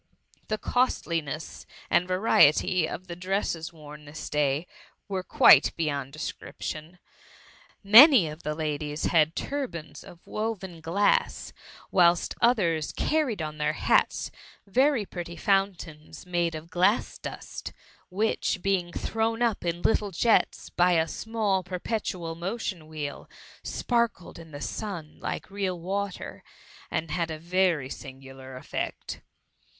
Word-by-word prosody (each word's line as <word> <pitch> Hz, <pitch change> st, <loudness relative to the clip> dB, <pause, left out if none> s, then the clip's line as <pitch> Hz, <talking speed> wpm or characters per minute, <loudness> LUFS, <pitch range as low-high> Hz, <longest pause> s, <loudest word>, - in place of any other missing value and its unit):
The 215 Hz, -, -1 dB
costliness 165 Hz, -, -1 dB, 0.2 s
and 180 Hz, -, +2 dB
variety 185 Hz, -3 st, +4 dB
of 185 Hz, -, -6 dB
the 175 Hz, -2 st, -7 dB
dresses 180 Hz, -3 st, -2 dB
worn 150 Hz, -2 st, -12 dB
this 145 Hz, +1 st, -8 dB
day 150 Hz, +1 st, +1 dB, 0.4 s
were 190 Hz, -2 st, -2 dB
quite -, -, +6 dB
beyond 140 Hz, -4 st, -2 dB
description. 155 Hz, +2 st, -6 dB, 0.9 s
Many 230 Hz, -, +9 dB
of 155 Hz, +2 st, -8 dB
the 150 Hz, 0 st, -3 dB
ladies 150 Hz, -1 st, -3 dB
had 160 Hz, -1 st, +3 dB
turbans 170 Hz, -, -4 dB
of 175 Hz, -, -15 dB
woven 200 Hz, -6 st, -4 dB
glass; 185 Hz, +6 st, +1 dB, 0.4 s
whilst 175 Hz, -2 st, +4 dB
others 175 Hz, -10 st, +2 dB
carried 275 Hz, -, 0 dB
on 155 Hz, 0 st, -6 dB
their 150 Hz, 0 st, +1 dB
hats -, -, +1 dB, 0.3 s
very 255 Hz, +2 st, +2 dB
pretty 170 Hz, -2 st, -7 dB
fountains 175 Hz, -5 st, -1 dB
made 175 Hz, -2 st, 0 dB
of 160 Hz, +2 st, -9 dB
glass 185 Hz, +6 st, +2 dB
dust, -, -, -7 dB, 0.4 s
which, 195 Hz, -1 st, 0 dB
being 185 Hz, -3 st, 0 dB
thrown 225 Hz, +5 st, -1 dB
up 230 Hz, -4 st, 0 dB
in 175 Hz, 0 st, -2 dB
little 210 Hz, -2 st, +2 dB
jets 220 Hz, +5 st, +1 dB
by 180 Hz, +1 st, +3 dB
a 165 Hz, -1 st, +3 dB
small 215 Hz, 0 st, -1 dB
perpetual 180 Hz, -2 st, -3 dB
motion 180 Hz, -1 st, -4 dB
wheel, 150 Hz, -2 st, -6 dB, 0.3 s
sparkled 235 Hz, -9 st, -1 dB
in 165 Hz, -1 st, -12 dB
the 145 Hz, -2 st, -9 dB
sun 180 Hz, -8 st, -5 dB
like -, -, -5 dB
real 190 Hz, -3 st, -2 dB
water, 195 Hz, +2 st, -4 dB, 0.5 s
and 160 Hz, -1 st, -2 dB
had 170 Hz, -2 st, -1 dB
a 160 Hz, -, -4 dB
very 170 Hz, -3 st, +1 dB
singular 135 Hz, 0 st, -10 dB
effect. -, -, -5 dB
175 Hz, 125 wpm, -27 LUFS, 155-200 Hz, 0.9 s, Many